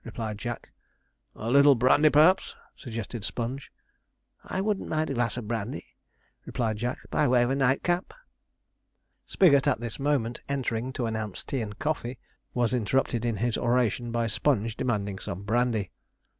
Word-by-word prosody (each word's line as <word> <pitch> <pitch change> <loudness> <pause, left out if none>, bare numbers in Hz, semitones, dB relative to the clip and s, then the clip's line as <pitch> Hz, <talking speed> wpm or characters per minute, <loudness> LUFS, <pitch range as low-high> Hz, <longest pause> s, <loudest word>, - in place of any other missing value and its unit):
replied 110 -2 -5
Jack. 120 +3 -6 0.6
'A 115 +2 -4
little 140 +1 +7
brandy, 130 +5 +5
perhaps?' 160 +6 +4 0.2
suggested 115 -2 -6
Sponge. 125 +5 -4 0.7
'I 185 - -3
shouldn't 205 0 -1
mind 155 -1 0
a - - -1
glass 120 -2 0
of 115 -4 -5
brandy,' 115 +1 -4 0.5
replied 110 -3 -2
Jack, 120 +3 -2
'by 150 - +2
way 125 -1 +4
of 120 - 0
a - - +1
nightcap.' 140 +7 +1 1.2
Spigot, 145 -7 +4
at 140 - +2
this 120 +1 -6
moment 135 -5 0
entering 130 -3 -2
to 125 - -2
announce 110 -3 -4
tea 135 - -3
and 105 -2 -6
coffee, 140 -5 -2 0.4
was 120 0 +1
interrupted 120 0 0
in 115 -2 0
his 115 +3 -1
oration 120 -1 +1
by 115 0 0
Sponge 115 -1 0
demanding 100 -6 -2
some 95 +3 -6
brandy. 110 -2 0
120 Hz, 155 wpm, -27 LUFS, 115-135 Hz, 1.2 s, little